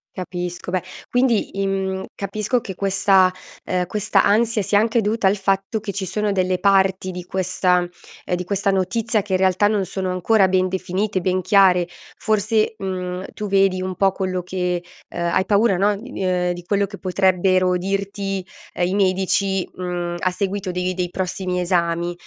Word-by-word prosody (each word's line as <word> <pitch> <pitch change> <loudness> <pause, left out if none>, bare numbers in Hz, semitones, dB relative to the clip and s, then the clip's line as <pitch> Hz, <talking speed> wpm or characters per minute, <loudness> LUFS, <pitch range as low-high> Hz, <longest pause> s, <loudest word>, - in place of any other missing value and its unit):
Capisco. 180 -1 -5
Beh, 185 -1 -1 0.3
quindi 240 -5 +1
im 190 -1 -1
capisco 215 +5 -1
che 190 -5 -7
questa 195 -1 +3 0.3
ehm, 180 -1 -1
questa 210 -2 +1
ansia 220 +1 +2
sia 205 +2 +2
anche 225 +2 +2
dovuta 210 -1 +1
al 200 +2 +2
fatto 195 +3 0
che 200 -2 -5
ci 195 -1 -3
sono 210 +2 -1
delle 185 -1 0
parti 190 -1 +2
di 180 0 -6
questa 180 -1 +1 0.4
ehm, 180 - 0
di 180 - -3
questa 200 +2 0
notizia 210 +4 0
che 200 -1 -10
in - - +4
realtà 190 +2 +3
non 205 -3 0
sono 185 -1 -3
ancora 190 +2 +3
ben 185 0 +2
definite, 190 +1 -2
ben 185 +1 +1
chiare. 185 -3 +4 0.3
Forse, 215 +1 +1
mhmm, 185 -1 -4
tu 210 - -5
vedi 195 -1 +2
un 185 0 -3
po' 195 +1 +3
quello 185 -2 -3
che, 180 -1 -2 0.3
uhm, - - -4
hai 185 - +2
paura, 205 -2 +3
no, 205 +2 +2
di 245 +6 -10
di 195 - -4
uhm, 180 -1 +1
di 175 0 -6
quello 200 +2 +1
che 200 0 -9
potrebbero 185 -1 +2
dirti, 195 0 -3 0.3
ehm, 175 - 0
i 185 - -2
medici, 190 0 +1
mhmm, 175 -1 -3
a 185 - +1
seguito 195 0 -2
dei 180 +1 -1
dei 180 -1 -2
prossimi 185 0 -2
esami. 170 -1 0
190 Hz, 180 wpm, -21 LUFS, 180-200 Hz, 0.4 s, in